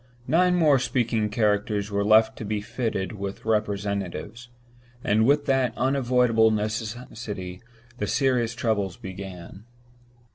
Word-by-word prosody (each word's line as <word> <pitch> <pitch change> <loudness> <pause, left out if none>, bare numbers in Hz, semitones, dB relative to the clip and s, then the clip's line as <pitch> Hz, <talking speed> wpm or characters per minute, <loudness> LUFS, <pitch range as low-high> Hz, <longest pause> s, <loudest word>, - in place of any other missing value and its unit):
Nine 180 +2 +3
more 150 -6 +4
speaking 120 -4 0
characters 105 -1 0
were 100 0 0
left 110 +2 +4
to - - -5
be 105 0 -2
fitted 105 -2 -3
with 100 -2 -6
representatives; 105 0 -2 0.5
and 110 +3 +3
with 145 +1 +3
that 135 -3 +1
unavoidable 125 -3 +3
necessity 110 -3 -4 0.4
the 105 - -1
serious 125 -3 +1
troubles 105 -6 -1
began. 95 0 -9
110 Hz, 115 wpm, -25 LUFS, 100-125 Hz, 0.5 s, more